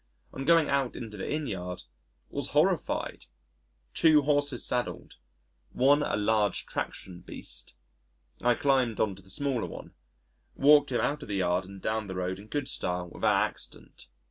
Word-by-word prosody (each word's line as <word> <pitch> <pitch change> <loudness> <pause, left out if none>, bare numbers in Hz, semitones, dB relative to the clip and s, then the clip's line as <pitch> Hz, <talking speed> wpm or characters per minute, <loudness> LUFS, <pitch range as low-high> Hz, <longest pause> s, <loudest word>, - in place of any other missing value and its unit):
On 135 - -5
going 165 -1 +5
out 140 -3 0
into 110 -3 -7
the 100 - -5
Inn 150 0 -1
yard, 90 -6 -5 0.5
was - - -3
horrified - - +1 0.7
two 155 -3 +5
horses 145 -3 +1
saddled 125 0 -2 0.6
one 140 +4 +4
a 125 - 0
large 105 -1 +1
traction 90 -2 -5
beast.... - - -8 0.7
I 120 0 +3
climbed 130 -5 +2
on 105 -3 +2
to 95 - -13
the 95 - -20
smaller 135 +2 -1
one, - - -10 0.6
walked 145 0 +5
him 120 - +1
out 150 +1 0
of - - -9
the 100 - -1
yard 90 -1 +1
and 100 +1 -10
down 110 -1 -1
the 95 - -5
road 90 +1 -2
in 105 - -12
good 145 +2 -2
style 90 0 -2
without - - +2
accident. - - -12
120 Hz, 165 wpm, -29 LUFS, 95-140 Hz, 0.7 s, going